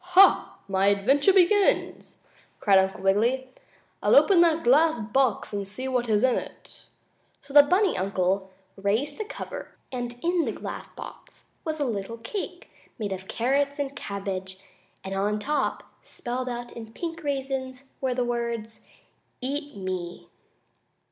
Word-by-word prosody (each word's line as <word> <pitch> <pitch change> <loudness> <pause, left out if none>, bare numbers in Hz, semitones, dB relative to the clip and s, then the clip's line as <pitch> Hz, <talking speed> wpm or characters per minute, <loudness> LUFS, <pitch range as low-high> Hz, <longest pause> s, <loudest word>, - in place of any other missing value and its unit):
"Ha! 390 +1 +6
My 195 0 +2
adventure 260 - +4
begins!" 390 +2 +2 0.4
cried 195 -2 +5
Uncle 190 0 -1
Wiggily. 235 +7 +1 0.5
"I'll - - +4
open 380 -4 +6
that 330 -1 +3
glass 305 +3 +4
box 230 0 0
and 200 -1 -3
see 255 +7 -5
what 250 -2 -1
is 210 +1 +3
in 260 -2 +3
it." - - -13 0.6
So 280 0 -13
the 290 - +11
bunny 365 +6 +2
uncle 190 0 0 0.3
raised 220 - -1
the 430 - -2
cover, - - -8 0.2
and 245 -2 -4
in 345 -1 +2
the - - -2
glass - - -7
box - - -12
was 315 -2 -3
a 290 - +1
little 225 -1 -3
cake, 355 - -6 0.3
made 210 -3 -3
of 190 0 -5
carrots 280 +4 0
and 280 -1 -3
cabbage, 190 -4 -5 0.5
and 190 - -5
on 205 +2 0
top, 280 +6 -1 0.2
spelled 250 +1 -5
out 240 0 -5
in 225 -1 -10
pink 335 +2 -5
raisins, 270 -1 -3
were 260 -2 0
the 250 -1 0
words: 235 -2 -3 0.6
"EAT 285 -1 -4
ME!" 185 -2 -5
245 Hz, 150 wpm, -26 LUFS, 200-285 Hz, 0.6 s, the